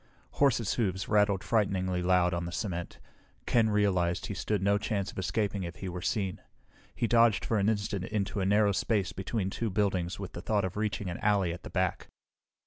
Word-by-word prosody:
Horses' 125 -7 +2
hoofs 95 -5 -1
rattled 105 -2 +2
frighteningly 95 -4 +1
loud 90 0 +3
on 85 0 -2
the 85 - -5
cement. 85 -1 -4 0.5
Ken 115 -2 +3
realized 90 -4 +1
he - - -4
stood 100 +1 -1
no 100 +1 +3
chance 100 -2 -2
of - - -7
escaping 100 +1 -1
if 85 -1 -5
he 95 -1 -6
were 90 0 -5
seen. 95 0 -2 0.5
He 120 - 0
dodged 115 -2 +4
for 110 - +1
an 100 +2 +3
instant 100 -3 -1
into 105 -1 -2
a 95 - 0
narrow 105 +1 +4
space 100 -1 0
between 95 0 -2
two 115 +2 -2
buildings 95 -3 0
with 100 - -6
the 85 - -6
thought 105 -1 +1
of 95 - -4
reaching 105 -3 -2
an 85 - -6
alley 100 -5 +2
at 90 - -9
the - - -9
back. 90 -1 -1
100 Hz, 200 wpm, -30 LUFS, 90-105 Hz, 0.5 s, dodged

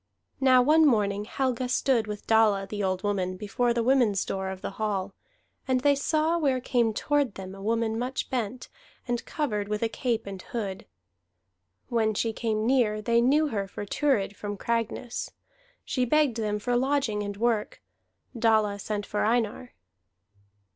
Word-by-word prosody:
Now 255 -2 +5
one 310 +4 +5
morning 210 -7 +2
Helga 255 0 -1
stood 245 -4 +2
with 210 -1 -6
Dalla 215 -3 +3
the 205 +1 -4
old 185 -1 -1
woman 185 -3 -1
before 235 +5 0
the 235 0 0
women's 240 -6 +3
door 190 0 -3
of 190 0 -7
the - - -3
hall, 200 -2 -1 0.5
and 255 -1 +2
they 285 +1 +4
saw 310 +4 +1
where 270 -5 +1
came 240 -2 +1
toward 285 +1 0
them 190 0 -7
a 195 - -10
woman 225 +1 0
much 255 +2 -3
bent, 245 -1 -3 0.4
and 240 -1 -1
covered 210 -10 -2
with 210 +1 -2
a - - +3
cape 235 0 -2
and 195 -2 -7
hood; 200 -4 -5 1.0
when 220 -3 +1
she 225 +2 0
came 220 -1 -1
near, 235 -4 +2
they 235 +2 +2
knew 295 +5 +3
her 200 -5 -2
for 205 - -7
Thurid 205 -4 0
from 205 0 -5
Cragness. 235 +2 -2 0.6
She 255 - 0
begged 275 -1 +2
them 210 -2 -1
for 245 +4 -1
lodging 260 -4 +1
and 205 -1 -5
work. 225 -1 0 0.6
Dalla 220 -3 +2
sent 205 0 -3
for 210 - -1
Einar. 230 +2 -1
225 Hz, 165 wpm, -27 LUFS, 205-255 Hz, 1.0 s, Now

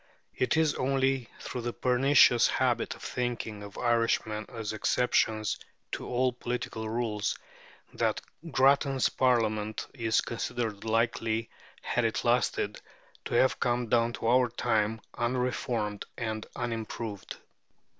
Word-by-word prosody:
It 130 +5 +1
is 160 -2 +3
only 135 -1 0
through 125 - -5
the 120 0 -3
pernicious 125 -1 +5
habit - - 0
of - - -14
thinking 120 -4 -3
of 100 -1 -10
Irishmen 115 -3 +1
as 110 -2 -4
exceptions 110 -1 +1 0.3
to - - -4
all 125 +1 +1
political 120 -2 -4
rules 110 -2 -1 0.6
that - - 0 0.3
Grattan's 135 -1 +3
Parliament 110 -4 +1
is 115 -4 +1
considered 115 -3 -3
likely, 115 0 0 0.3
had - - 0
it - - 0
lasted, - - +1 0.4
to - - -2
have 130 +2 +3
come 120 -1 0
down 120 0 +3
to - - -6
our 125 +1 +4
time 110 -1 0 0.2
unreformed 120 -3 -1
and 110 -2 -3
unimproved. 115 -3 -4
120 Hz, 120 wpm, -29 LUFS, 110-125 Hz, 0.6 s, pernicious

